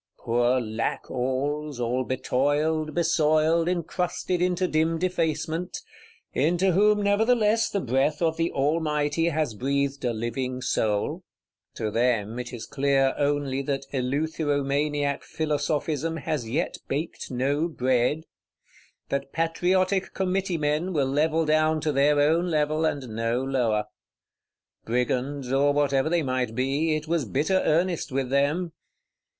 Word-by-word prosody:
Poor 120 +2 +1
Lackalls, 130 +5 -2
all 125 +2 0
betoiled, 145 +5 0
besoiled, 160 0 +2
encrusted 180 +1 -2
into 180 0 +1
dim 160 0 +1
defacement; 170 -1 -1 0.6
into 175 +6 +2
whom 210 +3 +3
nevertheless 220 +2 +3
the 200 - -1
breath 135 +1 0
of 165 -2 +1
the 165 +1 0
Almighty 150 +1 0
has 155 -6 -1
breathed 140 +4 -1
a 120 - +1
living 120 +3 -3
soul! 110 -5 -1 0.5
To 110 -1 -2
them 115 -1 0
it 125 -1 -5
is 120 -3 -7
clear 135 -1 +2
only 145 -2 0
that 135 0 -3
eleutheromaniac 145 +1 0
Philosophism 155 +1 -1
has 140 -5 -3
yet 155 +9 -1
baked 150 +5 -4
no 140 +5 0
bread; 130 0 +1 0.9
that 140 0 -2
Patrioti 180 +4 +1
Committee 190 -1 -2
men 155 +4 0
will 145 -4 +2
level 155 +4 +1
down 155 +1 +2
to 150 - 0
their 145 +1 +3
own 160 +5 +3
level, 155 0 +1
and 140 -4 -1
no 115 +3 -1
lower. 120 -6 0 1.0
Brigands, 125 +3 -1
or 140 +1 +3
whatever 140 0 +2
they 170 -1 +1
might 130 -4 -1
be, 140 +5 +1
it 155 0 -4
was 165 -2 +1
bitter 150 - +1
earnest 170 -1 +1
with 130 -1 -2
them. 150 +6 +1
145 Hz, 125 wpm, -26 LUFS, 130-165 Hz, 1.0 s, whom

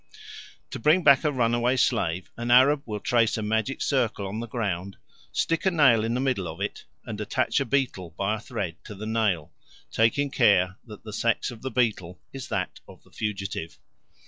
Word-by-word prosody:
To - - -5
bring 155 +9 +4
back 140 -4 +6
a 150 - +2
runaway 120 0 +1
slave 90 -6 0
an 120 +1 -4
Arab 135 +4 +6
will 105 -2 -4
trace 115 +1 +2
a 110 - -3
magic 110 +5 -1
circle 120 -7 0
on 100 +3 -4
the 120 - -5
ground, 100 -5 -3 0.3
stick 165 -1 0
a 190 - +4
nail 135 -10 +4
in 115 +1 -1
the - - 0
middle 130 -9 0
of 80 +2 -7
it, 100 - -4 0.2
and 105 -1 -5
attach 130 +6 0
a 140 - -1
beetle 115 -10 -1
by 100 +2 0
a - - -7
thread 100 -8 -5
to 105 - -8
the 105 +2 -7
nail, 110 -8 0 0.4
taking 135 +5 +2
care 100 -7 +3
that 105 -1 -11
the 110 -1 -8
sex 115 +3 0
of 115 -2 -11
the 130 - -3
beetle 110 -8 -1
is 135 -3 -7
that - - -3
of - - -15
the - - -24
fugitive. 95 -7 -4
115 Hz, 195 wpm, -26 LUFS, 100-130 Hz, 0.4 s, back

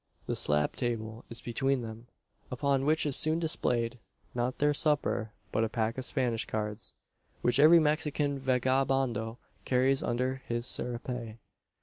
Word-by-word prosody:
The - - -2
slab 75 0 +3
table 115 -2 -3
is 115 - 0
between 135 +2 0
them, 115 +1 -9 0.4
upon 135 +1 0
which 155 +1 +2
is 145 -3 +2
soon 155 +1 +3
displayed, 125 -7 0 0.3
not 125 +1 -1
their 145 0 +2
supper, 145 -7 +1 0.2
but 110 - +1
a 110 - 0
pack 110 0 -1
of - - -3
Spanish 125 -6 -1
cards, 105 0 -4 0.5
which 120 +2 +2
every 155 +4 +8
Mexican 150 -2 0
vagabondo 130 -3 0 0.3
carries 130 +1 +2
under 130 +2 -1
his 120 0 -2
serape. 120 -2 -3
125 Hz, 140 wpm, -30 LUFS, 115-135 Hz, 0.5 s, every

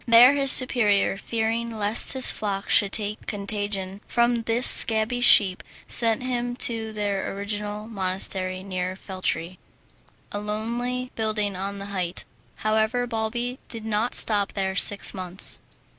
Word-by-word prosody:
There, 240 +3 +7
his 275 -2 +5
superior 215 -7 +4
fearing 225 +2 -4
lest 210 +2 +3
his 260 -1 +3
flock 200 -2 -5
should 200 -3 +3
take 210 0 -5
contagion 200 -1 -4
from 235 0 0
this 235 +2 +1
scabby 225 +2 +4
sheep, 195 -6 +4 0.3
sent 230 0 +1
him 245 -1 -3
to 225 -3 -1
their 205 -2 -4
original 205 +1 -5
monastery 185 -2 -2
near 185 -1 -5
Feltre, 185 -2 -5 0.7
a 205 - -5
lonely 235 +4 -4
building 215 -3 -3
on 200 +2 -5
a 200 - -7
height. 185 -3 -5 0.4
However, 220 +3 0
Balbi 240 +2 -4
did 225 -2 -5
not 220 +2 -1
stop 205 -2 +1
there 190 -1 -3
six 200 +2 +3
months. 185 0 +3
210 Hz, 135 wpm, -23 LUFS, 195-235 Hz, 0.7 s, There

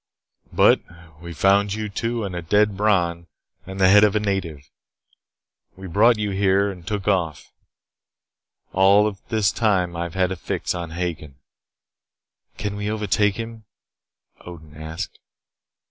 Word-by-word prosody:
But - - +5 0.4
we 85 0 -8
found 100 +5 +2
you 110 0 -4
two 115 +3 -3
and 95 -3 -5
a 85 - -3
dead 105 +4 +2
Bron 90 -5 0 0.4
and 95 0 -7
the 95 - +5
head 105 +2 +7
of 105 0 +3
a - - +3
native. 95 -8 -3 1.1
We 95 - -10
brought 110 +6 +3
you 105 -1 -2
here 100 +1 +2
and 90 -3 -13
took 105 -2 -3
off. 85 -7 -1 1.2
All 100 +3 +4 0.2
this 110 -4 +2
time 95 -6 0
I 85 - -4
have 85 - -8
had 95 -1 +1
a - - -2
fix 85 - -3
on 85 -2 -5
Hagen." 80 -4 -5 1.2
"Can't 105 0 -4
we 105 0 -3
overtake 105 -1 +1
him?" 115 -1 -7 0.7
Odin 80 -4 -12
asked. 80 +1 -7
95 Hz, 145 wpm, -22 LUFS, 85-105 Hz, 1.2 s, head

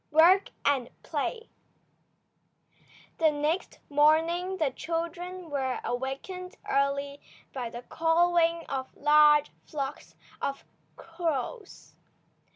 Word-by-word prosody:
WORK 345 +6 +5 0.2
AND 270 -4 +2
PLAY 450 - -3 1.7
THE 320 -1 +5
next 300 +5 -1
morning 325 +5 +3
the 310 -6 +1
children 340 +3 -4
were 265 -3 -1
awakened 270 +9 -4
early 280 +1 0 0.3
by 250 -3 -4
the 240 +1 -8
cawing 335 +1 +2
of 260 -1 -5
large 295 0 +5
flocks 280 -1 -6 0.3
of 275 - -3 0.3
crows. 335 - -4
310 Hz, 90 wpm, -28 LUFS, 280-345 Hz, 1.7 s, WORK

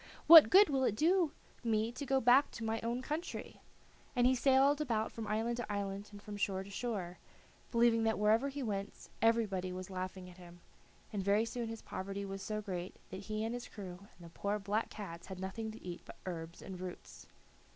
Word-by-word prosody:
What 325 -1 +11
good 400 +3 +8
will 270 -3 +1
it 220 - +2
do 335 - +3 0.3
me 225 -1 +1
to 270 +3 -6
go 270 -1 +3
back 260 +3 +5
to 230 - -6
my 225 0 -1
own 235 +2 -2
country?" 310 +5 -5 0.5
And 245 - +3
he 255 - +5
sailed 270 +3 +4
about 225 -6 0
from 225 -2 -6
island 225 +3 -1
to 240 -3 -4
island, 200 0 -3
and 205 - -10
from 205 0 -8
shore 190 -1 -1
to 200 - -12
shore, 195 -6 -4 0.5
believing 235 -1 +4
that 220 - +1
wherever 220 +6 +3
he 280 0 -5
went 200 -3 -4
everybody 210 -5 +2
was 185 +1 -6
laughing 185 0 -5
at 180 0 -14
him, 175 -1 -13 0.5
and 205 - -1
very 200 +3 +3
soon 235 0 -4
his 225 0 -7
poverty 195 +1 -5
was 195 0 -6
so 215 +1 -3
great 185 -2 -5 0.2
that 190 - -5
he 215 0 -1
and 225 +1 -2
his 245 0 -5
crew 185 -3 -8 0.2
and 175 - -13
the - - -10
poor 200 +1 -1
black 210 +2 -1
cats 170 -5 -8
had 190 -1 -7
nothing 205 +4 -4
to 220 -3 -10
eat 175 -1 -6
but - - -12
herbs 170 -2 -6
and 185 -2 -7
roots. 180 -1 -9
215 Hz, 210 wpm, -34 LUFS, 190-240 Hz, 0.5 s, What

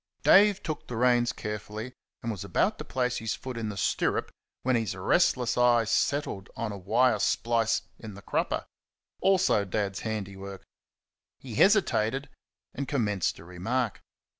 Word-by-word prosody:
Dave 205 0 +6
took 155 -2 -5
the 120 - -5
reins 120 0 +3
carefully, 105 +3 -6 0.3
and 115 - -1
was 100 - -5
about - - 0
to - - -4
place 125 -1 -1
his 110 0 -2
foot 130 -1 -7
in 115 -2 -3
the 100 - -6
stirrup - - 0 0.3
when 130 0 +2
his 110 -5 -1
restless 125 - +2
eye 120 -1 +5
settled 115 -3 -1
on 115 -2 -3
a 100 - -6
wire 110 +4 +2
splice 115 +1 +1 0.2
in 110 -3 -9
the 100 - -12
crupper - - -1 0.5
also 190 - +3
Dad's 100 0 -2
handiwork. 100 -3 -5 0.7
He 125 -4 -10
hesitated 135 - +2 0.4
and 140 0 -4
commenced 105 - 0
a 80 - -13
remark. 105 +7 -2
115 Hz, 150 wpm, -28 LUFS, 105-125 Hz, 0.7 s, Dave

